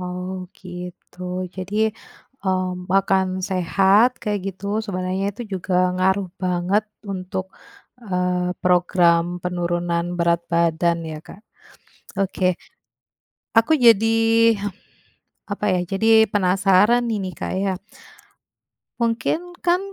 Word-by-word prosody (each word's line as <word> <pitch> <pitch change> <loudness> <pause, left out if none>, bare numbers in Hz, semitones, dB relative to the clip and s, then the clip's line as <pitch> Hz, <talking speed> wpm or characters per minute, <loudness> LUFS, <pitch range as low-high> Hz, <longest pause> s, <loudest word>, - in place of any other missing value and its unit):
Oh 180 +1 -5
gitu, 180 0 -10 0.4
jadi, 190 +3 -5 0.7
mmm, 185 -1 -1
makan 190 -1 +3 0.2
sehat 190 +5 +4
kayak 210 -3 -1
gitu 190 - -15 0.2
sebenarnya 185 -1 -2
itu 240 +5 -7
juga 185 0 -3 0.2
ngaruh 190 +1 +1
banget 180 +4 +1 0.3
untuk, 185 0 -4 0.6
eee, 180 -1 0
program 175 -1 +3
penurunan 175 -1 -1
berat 170 0 +2
badan 170 0 +2
ya 155 - -6
Kak. 200 - -13 0.8
Oke. 185 -2 +1 1.0
Aku 230 +8 +5
jadi, 225 -3 +5 1.4
apa 205 +1 -2
ya, - - 0
jadi 220 +4 +4
penasaran 195 +4 +3
nih 220 - 0
ini 185 -1 -4
Kak - - -4
ya, 195 0 0 1.3
mungkin 255 +10 -1
kan 350 +1 +3
185 Hz, 100 wpm, -22 LUFS, 180-200 Hz, 1.4 s, Aku